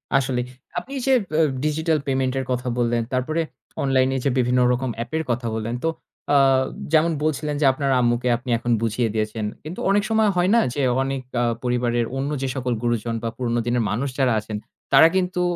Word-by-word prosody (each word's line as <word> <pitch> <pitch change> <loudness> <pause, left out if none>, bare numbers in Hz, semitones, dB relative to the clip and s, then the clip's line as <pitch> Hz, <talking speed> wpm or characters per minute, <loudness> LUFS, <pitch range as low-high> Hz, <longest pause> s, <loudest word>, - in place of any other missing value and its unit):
আসলেই 130 -2 +1 0.3
আপনি 270 - -11
যে, 270 - +2 0.3
আ - - +6 0.2
digital 160 +1 +1
payment 130 -1 0
এর 130 - -3
কথা 125 0 -2
বললেন 120 -1 +1
তারপরে 155 +6 0 0.4
online 130 -1 +3
এ - - +1
যে, - - +4
বিভিন্ন 125 0 +2
রকম 125 +1 -2
app 120 - -16
এর 160 - -1
কথা 120 0 -2
বললেন। 110 +2 -3
তো 165 - +2 0.5
আ-যেমন 140 +4 +3
বলছিলেন 150 -1 -1
যে, - - +4
আপনার 140 0 -1
আম্মুকে 120 0 +1
আপনি 125 +2 -10
এখন 120 +1 -2
বুঝিয়ে 115 +1 0
দিয়েছেন। 110 0 -2 0.2
কিন্তু 160 +4 -7
অনেক 200 +1 +3
সময় 220 -1 +3
হয় 180 +1 +2
না - - +6
যে, 145 - -2 0.2
অনেক 135 0 -2 0.2
আ-পরিবারের 120 0 0
অন্য 135 +2 -1
যে, 135 - -1
সকল 125 -2 -1
গুরুজন 120 -1 -1
বা 115 - -1
পুরনো 120 -2 0
দিনের 120 0 +1
মানুষ 120 +8 -1
যারা 130 -3 +3
আছেন 105 0 -5 0.4
তারা 135 +4 +9
কিন্তু 180 -1 0
130 Hz, 190 wpm, -23 LUFS, 120-145 Hz, 0.5 s, তারা